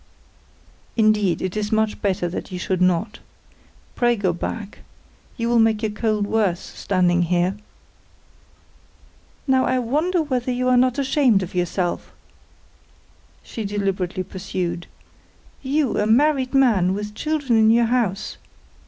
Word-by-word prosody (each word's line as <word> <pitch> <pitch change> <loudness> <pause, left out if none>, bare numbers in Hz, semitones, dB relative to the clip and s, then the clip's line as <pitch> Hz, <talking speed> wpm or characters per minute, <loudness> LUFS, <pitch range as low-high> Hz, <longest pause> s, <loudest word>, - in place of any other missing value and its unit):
"Indeed 215 -5 +2
it 185 +1 -3
is 210 0 -2
much 220 -1 0
better 190 -3 0
that 180 +2 -6
you 180 - -4
should 185 0 -2
not. 185 +4 +1 0.7
Pray 240 -1 +2
go 195 -5 0
back. 205 +4 -6 0.6
You 230 -1 -1
will 235 0 +3
make 225 -1 +2
your 215 - 0
cold 210 -1 -1
worse, 200 -5 0
standing 180 -2 0
here. 175 +2 +1 1.9
"Now, 260 -1 +3
I 255 - +1
want 290 +9 0
to - - +3
know 330 - +2
whether 255 -4 -2
you 255 +1 0
are 255 - +4
not 255 +1 +3
ashamed 265 -7 +2
of 180 - -8
yourself?" 180 0 -2 1.3
she 225 - -6
deliberately 195 -2 -2
pursued. 180 -2 -4 0.7
"You! 280 -2 0
A 210 - +1
married 270 +2 +2
man, 205 -9 +3
with 210 +1 -5
children 290 -1 -1
in 220 0 +5
your 235 +1 +4
house! 225 -5 -1
215 Hz, 140 wpm, -22 LUFS, 185-250 Hz, 1.9 s, in